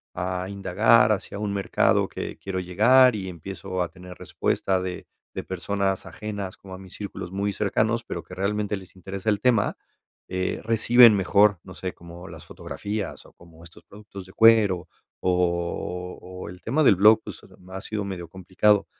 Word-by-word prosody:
a 90 Hz, +1 st, -3 dB
indagar 100 Hz, +4 st, +3 dB
hacia 100 Hz, -1 st, -3 dB
un 105 Hz, -1 st, -2 dB
mercado 100 Hz, -, +2 dB
que -, -, -6 dB
quiero 95 Hz, -1 st, -4 dB
llegar 115 Hz, +8 st, +5 dB
y 95 Hz, -2 st, -5 dB
empiezo 95 Hz, +1 st, -6 dB
a 90 Hz, -, -1 dB
tener 90 Hz, 0 st, -12 dB
respuesta 95 Hz, +1 st, -1 dB
de 90 Hz, -1 st, -6 dB, 0.3 s
de -, -, -5 dB
personas 95 Hz, +1 st, -2 dB
ajenas 100 Hz, -3 st, -6 dB
como 95 Hz, -1 st, -11 dB
a -, -, -9 dB
mis 95 Hz, -1 st, -13 dB
círculos 100 Hz, -3 st, -7 dB
muy 100 Hz, +1 st, -1 dB
cercanos, 110 Hz, +3 st, 0 dB
pero 85 Hz, -, -5 dB
que 90 Hz, +2 st, -11 dB
realmente 105 Hz, +2 st, -1 dB
les 95 Hz, -1 st, -14 dB
interesa 95 Hz, +3 st, -4 dB
el 105 Hz, -1 st, -1 dB
tema, 115 Hz, -4 st, +2 dB, 0.5 s
eh, 95 Hz, 0 st, -2 dB
reciben 115 Hz, +1 st, +6 dB
mejor, 100 Hz, 0 st, +3 dB
no 90 Hz, -, -11 dB
sé, 95 Hz, 0 st, -5 dB
como 85 Hz, +1 st, -12 dB
las 80 Hz, -2 st, -11 dB
fotografías 105 Hz, -1 st, -6 dB
o -, -, -18 dB
como 85 Hz, -1 st, -18 dB
estos 85 Hz, -, -15 dB
productos 100 Hz, -2 st, -12 dB
de 95 Hz, -, -16 dB
cuero 105 Hz, -6 st, +4 dB, 0.3 s
o 90 Hz, 0 st, -2 dB, 0.3 s
o -, -, -7 dB
el 90 Hz, +1 st, -12 dB
tema 145 Hz, +7 st, +1 dB
del 115 Hz, -, +6 dB
blog, 110 Hz, +3 st, +6 dB
pues, -, -, -9 dB, 0.3 s
ha 95 Hz, +1 st, -6 dB
sido 105 Hz, -1 st, -4 dB
medio 95 Hz, -3 st, -6 dB
complicado, 95 Hz, +4 st, +1 dB
95 Hz, 175 wpm, -25 LUFS, 90-105 Hz, 0.5 s, reciben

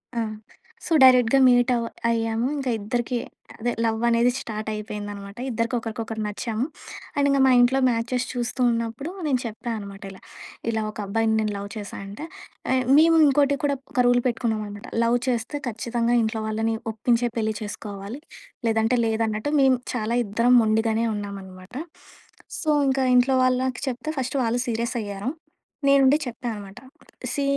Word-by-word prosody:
ఆ! -, -, 0 dB, 0.7 s
సో 335 Hz, -, -1 dB
డైరెక్ట్‌గా 255 Hz, 0 st, +6 dB
మీట్ 245 Hz, 0 st, +4 dB
అవ్ 235 Hz, -1 st, -1 dB, 0.2 s
అయ్యాము. 225 Hz, +1 st, 0 dB
ఇంక 270 Hz, -2 st, -4 dB
ఇద్దరికీ 240 Hz, +4 st, -2 dB, 0.4 s
అదే 240 Hz, +2 st, 0 dB
లవ్ 225 Hz, 0 st, 0 dB
అనేది 235 Hz, +1 st, +3 dB
స్టార్ట్ 215 Hz, -1 st, -6 dB
అయిపోయిందనమాట. 205 Hz, -1 st, -6 dB
ఇద్దరికి 230 Hz, +1 st, -1 dB
ఒకరికొకరు 225 Hz, -1 st, -4 dB
నచ్చాము. 220 Hz, +3 st, -2 dB, 0.5 s
అండ్ 285 Hz, 0 st, +2 dB
ఇంక 275 Hz, 0 st, +3 dB
మా 260 Hz, -, +5 dB
ఇంట్లో 245 Hz, +2 st, +4 dB
మ్యాచెస్ 245 Hz, +2 st, -1 dB
చూస్తూ 245 Hz, +1 st, -3 dB
ఉన్నప్పుడు 230 Hz, +7 st, -3 dB, 0.2 s
నేను 260 Hz, -4 st, +2 dB
చెప్పా 225 Hz, +2 st, -5 dB
అనమాట 200 Hz, 0 st, -9 dB
ఇలా. 190 Hz, -, -14 dB, 0.5 s
ఇలా 220 Hz, -, -1 dB
ఒక -, -, -14 dB
అబ్బాయిని 220 Hz, +2 st, +1 dB
నేను 215 Hz, -1 st, 0 dB
లవ్ 200 Hz, 0 st, -6 dB
చేశా 205 Hz, -1 st, -7 dB
అంటే 205 Hz, +10 st, -7 dB, 0.5 s
యే -, -, +3 dB, 0.2 s
మేము 330 Hz, +1 st, +6 dB
ఇంకోటి 280 Hz, 0 st, +3 dB
కూడా 285 Hz, -1 st, +2 dB, 0.2 s
ఒక 255 Hz, -, -1 dB
రూల్ 245 Hz, 0 st, +4 dB
పెట్టుకున్నామనమాట. 215 Hz, -4 st, -2 dB, 0.2 s
లవ్ 235 Hz, +1 st, +3 dB
చేస్తే 250 Hz, +4 st, -1 dB
ఖచ్చితంగా 235 Hz, +1 st, 0 dB
ఇంట్లో 220 Hz, 0 st, -1 dB
వాళ్ళని 225 Hz, +1 st, 0 dB, 0.2 s
ఒప్పించే 235 Hz, +2 st, +1 dB
పెళ్లి 220 Hz, -1 st, 0 dB
చేసుకోవాలి. 205 Hz, +2 st, -6 dB, 0.5 s
లేదంటే 225 Hz, +2 st, +2 dB
లేదన్నట్టు 220 Hz, +3 st, -1 dB
మేము 265 Hz, -1 st, +5 dB, 0.2 s
చాలా 230 Hz, -1 st, -1 dB
ఇద్దరం 230 Hz, +5 st, +2 dB
మొండిగానే 220 Hz, +1 st, +1 dB
ఉన్నామనమాట. 195 Hz, 0 st, -8 dB, 0.9 s
సో 315 Hz, -, -1 dB, 0.2 s
ఇంక 265 Hz, 0 st, +1 dB, 0.2 s
ఇంట్లో 255 Hz, +2 st, +4 dB
వాళ్ళకి 255 Hz, 0 st, +1 dB
చెప్తే 255 Hz, +5 st, -5 dB
ఫస్ట్ 260 Hz, +2 st, -2 dB
వాళ్ళు 240 Hz, +1 st, 0 dB
సీరియస్ 235 Hz, +1 st, -2 dB
అయ్యారు. 205 Hz, +2 st, -4 dB, 0.6 s
నేను 275 Hz, 0 st, +6 dB
ఉండి 275 Hz, +3 st, +5 dB
చెప్పా 245 Hz, 0 st, -6 dB
అనమాట. 200 Hz, -2 st, -9 dB, 0.5 s
సీ 285 Hz, -, -1 dB
230 Hz, 150 wpm, -24 LUFS, 215-250 Hz, 0.9 s, డైరెక్ట్‌గా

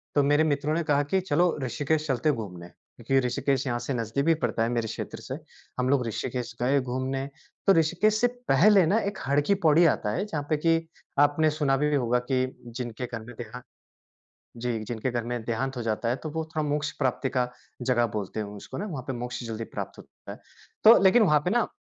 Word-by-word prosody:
तो 145 Hz, -, +5 dB
मेरे 145 Hz, +2 st, +4 dB
मित्रों 150 Hz, 0 st, 0 dB
ने 170 Hz, -, +1 dB
कहा 145 Hz, -2 st, +2 dB
कि, 190 Hz, +7 st, +1 dB
"चलो 175 Hz, 0 st, +1 dB
ऋषिकेश 150 Hz, +4 st, -1 dB
चलते 135 Hz, +2 st, +1 dB
हैं 145 Hz, -, +2 dB
घूमने" 90 Hz, -5 st, -7 dB
क्योंकि 125 Hz, +9 st, -2 dB
ऋषिकेश 135 Hz, +2 st, 0 dB
यहाँ 120 Hz, -1 st, -1 dB
से 120 Hz, +3 st, -3 dB
नजदीक 115 Hz, +3 st, -1 dB
भी 165 Hz, -, +5 dB
पड़ता 115 Hz, -, +1 dB
है 115 Hz, -, 0 dB
मेरे 115 Hz, -2 st, -1 dB
क्षेत्र -, -, -6 dB
से, -, -, -5 dB, 0.4 s
हम 125 Hz, +1 st, +1 dB
लोग 135 Hz, -3 st, +2 dB
ऋषिकेश 120 Hz, +2 st, -4 dB
गए 135 Hz, +3 st, +3 dB
घूमने, 130 Hz, +2 st, -2 dB, 0.4 s
तो 195 Hz, -, +8 dB
ऋषिकेश 180 Hz, +6 st, +3 dB
से 245 Hz, -, +5 dB, 0.2 s
पहले 190 Hz, +5 st, +6 dB
ना 205 Hz, +7 st, +3 dB
एक 200 Hz, -2 st, -3 dB
हर 140 Hz, +2 st, +3 dB
की 200 Hz, -, +5 dB
पैड़ी 160 Hz, +2 st, +6 dB
आता 105 Hz, -, -3 dB
है 115 Hz, -, -1 dB
जहाँ 155 Hz, -8 st, -3 dB
पे 155 Hz, -, +2 dB
कि 165 Hz, +1 st, +1 dB, 0.3 s
आपने 145 Hz, +2 st, +4 dB
सुना 135 Hz, -2 st, +2 dB
भी 150 Hz, +1 st, +1 dB
होगा 125 Hz, -2 st, +2 dB
कि 130 Hz, 0 st, +2 dB, 0.3 s
जिनके 120 Hz, 0 st, -4 dB
घर 115 Hz, -2 st, -6 dB
में 120 Hz, +3 st, -11 dB
देहांत 120 Hz, +1 st, -7 dB, 1.0 s
जी, 120 Hz, -1 st, -2 dB
जिनके 120 Hz, +3 st, -3 dB
घर 120 Hz, -1 st, -1 dB
में 120 Hz, 0 st, -4 dB
देहांत 125 Hz, +3 st, -2 dB
हो -, -, -2 dB
जाता 115 Hz, +1 st, -1 dB
है 120 Hz, -, +1 dB
तो 155 Hz, -, -3 dB
वो 160 Hz, +1 st, -3 dB
थोड़ा 155 Hz, -, +1 dB
मोक्ष 145 Hz, 0 st, -1 dB
प्राप्ति 130 Hz, -1 st, 0 dB
का 125 Hz, -2 st, 0 dB, 0.3 s
जगह 120 Hz, -1 st, +2 dB
बोलते 100 Hz, +1 st, -4 dB
हैं 105 Hz, -, -3 dB
उसको 105 Hz, +5 st, -9 dB
ना 200 Hz, -, -3 dB
वहाँ 150 Hz, -11 st, -5 dB
पे 135 Hz, -, -2 dB
मोक्ष 120 Hz, +1 st, -5 dB
जल्दी 115 Hz, -1 st, -4 dB
प्राप्त -, -, -5 dB
होता -, -, -13 dB
है। -, -, -10 dB, 0.4 s
तो 225 Hz, +2 st, +9 dB
लेकिन 220 Hz, +5 st, +6 dB
वहाँ 150 Hz, -7 st, +4 dB
पे -, -, +2 dB
ना 240 Hz, +1 st, +2 dB
135 Hz, 225 wpm, -27 LUFS, 120-155 Hz, 1.0 s, तो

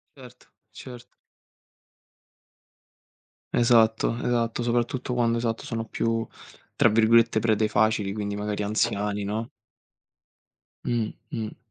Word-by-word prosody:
Certo, 125 Hz, -2 st, -15 dB, 0.2 s
cert 120 Hz, +3 st, -11 dB, 2.5 s
Esatto, 115 Hz, -1 st, +3 dB
esatto, 120 Hz, -1 st, 0 dB
soprattutto 120 Hz, +1 st, -1 dB
quando, 115 Hz, -1 st, +1 dB
esatto, 115 Hz, -1 st, -2 dB
sono 115 Hz, -1 st, -4 dB
più 115 Hz, 0 st, -1 dB, 0.5 s
tra -, -, +4 dB
virgolette 115 Hz, +1 st, +4 dB
"prede 110 Hz, -1 st, +2 dB
facili", 110 Hz, -3 st, +1 dB
quindi 100 Hz, -1 st, -3 dB
magari 105 Hz, 0 st, -3 dB
anziani, 105 Hz, 0 st, -1 dB
no? 110 Hz, +4 st, -3 dB, 1.3 s
Mh, 115 Hz, -3 st, -1 dB, 0.2 s
mh. 110 Hz, -3 st, -4 dB
115 Hz, 95 wpm, -25 LUFS, 105-120 Hz, 2.5 s, tra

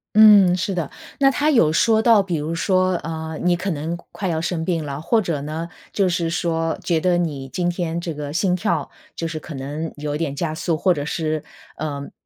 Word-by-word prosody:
嗯， 205 Hz, -4 st, +8 dB
是 195 Hz, +1 st, -2 dB
的， 170 Hz, -5 st, -2 dB, 0.3 s
那 275 Hz, -1 st, +5 dB
它 295 Hz, +3 st, +1 dB
有 195 Hz, -, +4 dB
说 220 Hz, +6 st, +3 dB
到 225 Hz, -3 st, +6 dB
比 180 Hz, -3 st, -2 dB
如 155 Hz, +2 st, -2 dB
说， 185 Hz, +1 st, +2 dB
呃， 160 Hz, -1 st, -5 dB
你 175 Hz, 0 st, +3 dB
可 190 Hz, +2 st, -2 dB
能 160 Hz, +3 st, -3 dB, 0.2 s
快 195 Hz, -, -4 dB
要 160 Hz, -2 st, 0 dB
生 165 Hz, -1 st, -2 dB
病 165 Hz, -3 st, 0 dB
了， 140 Hz, -1 st, -5 dB
或 220 Hz, +8 st, +2 dB
者 165 Hz, -6 st, -2 dB
呢， 160 Hz, +3 st, -4 dB, 0.2 s
就 195 Hz, -3 st, +2 dB
是 170 Hz, -1 st, 0 dB
说 165 Hz, -1 st, -1 dB
觉 165 Hz, -3 st, +1 dB
得 180 Hz, +1 st, +2 dB
你 145 Hz, -6 st, -2 dB
今 175 Hz, +5 st, -1 dB
天 170 Hz, -1 st, -2 dB
这 170 Hz, -1 st, -4 dB
个 145 Hz, -1 st, -5 dB
心 180 Hz, +2 st, +1 dB
跳， 190 Hz, +4 st, -1 dB, 0.3 s
就 165 Hz, -, -4 dB
是 165 Hz, -1 st, -3 dB
可 155 Hz, -1 st, -9 dB
能 145 Hz, +4 st, -4 dB
有 145 Hz, 0 st, -4 dB
一 -, -, -1 dB
点 145 Hz, -4 st, -2 dB
加 155 Hz, +1 st, -2 dB
速， 165 Hz, +1 st, -1 dB
或 180 Hz, +3 st, +3 dB
者 145 Hz, -2 st, -4 dB
是， 155 Hz, -1 st, -1 dB, 0.4 s
嗯， 140 Hz, -2 st, -4 dB
165 Hz, 235 characters per minute, -22 LUFS, 155-185 Hz, 0.4 s, 嗯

